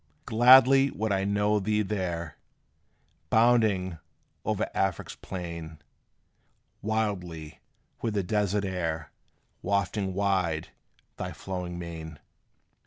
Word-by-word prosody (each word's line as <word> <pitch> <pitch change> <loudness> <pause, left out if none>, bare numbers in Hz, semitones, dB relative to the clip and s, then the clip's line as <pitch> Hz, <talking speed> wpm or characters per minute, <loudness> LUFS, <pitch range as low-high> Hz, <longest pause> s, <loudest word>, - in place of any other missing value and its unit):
Gladly 130 +4 +7
would 110 -4 -2
I 95 0 +1
know 105 +1 +2
thee 105 +2 +1
there, 85 -6 -3 0.9
Bounding 110 -7 +3 0.4
over - - -1
Afric's 95 -2 -1
plain, 85 -4 -7 1.0
Wildly, 90 -8 -3 0.4
with 110 -2 -2
the 100 - +1
desert 100 +1 0
air 80 -4 -3 0.5
Wafting 100 -1 -1
wide 95 -5 0 0.5
thy - - -4
flowing 90 -2 -5
mane. 80 -3 -7
95 Hz, 95 wpm, -28 LUFS, 85-105 Hz, 1.0 s, Gladly